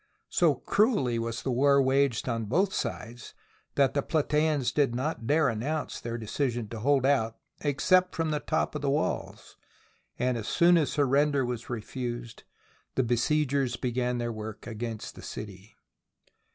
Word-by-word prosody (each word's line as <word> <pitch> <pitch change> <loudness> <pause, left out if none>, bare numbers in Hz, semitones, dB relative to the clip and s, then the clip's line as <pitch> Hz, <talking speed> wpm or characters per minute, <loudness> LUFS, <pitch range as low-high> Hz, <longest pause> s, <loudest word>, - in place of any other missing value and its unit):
So 170 -8 +3
cruelly 140 - +1
was 115 0 -3
the 135 - -1
war 140 +3 +4
waged 135 -2 +2
on 115 -2 -1
both 185 - +1
sides 120 +2 -5 0.4
that 140 -2 +3
the 140 - +1
Platseans 150 -4 +1
did 140 -5 +2
not 130 -2 -3
dare 150 +2 +4
announce 140 +7 -2
their 115 0 -4
decision 120 +1 -2
to 115 - -6
hold 135 +2 +2
out 115 -5 +2 0.2
except 180 +6 +2
from 165 -1 0
the 150 - 0
top - - -1
of 150 - -4
the 140 - 0
walls; 145 +3 -2 0.6
and 125 -1 0
as 110 - -6
soon 175 0 +5
as 150 -6 +2
surrender 140 -1 +2
was 120 -1 -5
refused, 120 0 -5 0.5
the 130 - +2
besiegers 135 +1 +1
began 125 0 -1
their 120 -1 -2
work 110 -1 -7
against 115 -1 -5
the - - -12
city. 100 0 -9
130 Hz, 155 wpm, -28 LUFS, 120-145 Hz, 0.6 s, soon